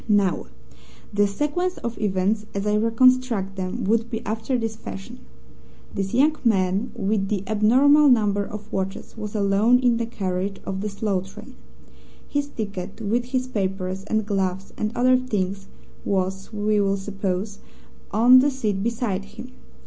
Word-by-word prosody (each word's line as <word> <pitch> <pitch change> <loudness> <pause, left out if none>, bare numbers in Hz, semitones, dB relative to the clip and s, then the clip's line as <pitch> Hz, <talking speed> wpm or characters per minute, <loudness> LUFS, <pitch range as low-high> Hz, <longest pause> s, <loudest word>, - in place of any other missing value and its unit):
"Now, 200 - +2 0.7
the 205 0 +3
sequence 295 - -1
of 235 -1 -4
events 205 +1 0
as 200 +1 -2
I 210 - +1
reconstruct 230 -2 +3
them 190 +5 -3
would 225 +3 +1
be 225 -2 -5
after 225 +4 -1
this 225 -2 -3
fashion. 95 - -9 0.7
This 195 -1 -2
young 295 +5 +3
man 195 0 +1
with 200 -2 0
the 200 -2 -1
abnormal 260 +9 +5
number 205 -5 +3
of 210 +1 -9
watches 195 0 -4
was 215 -1 -6
alone 205 +4 +4
in 245 -2 +2
the 230 -1 -2
carriage 195 -2 -3
of 190 0 -3
the 210 - -2
slow 200 -2 -1
train. 210 +7 -12 0.7
His 285 0 -1
ticket, 200 -6 -6
with 230 +3 0
his 255 0 -1
papers 190 -4 -3
and 220 0 0
gloves 190 -2 -2
and 215 0 -2
other 255 +1 +4
things, 195 -6 -2 0.4
was, 190 0 -2
we 210 -1 +1
will 195 0 +1
suppose, 195 0 -3 0.5
on 240 +5 +7
the 280 +3 +4
seat 215 -8 -2
beside 220 -3 -2
him. 230 +5 -11
210 Hz, 155 wpm, -23 LUFS, 195-235 Hz, 0.7 s, on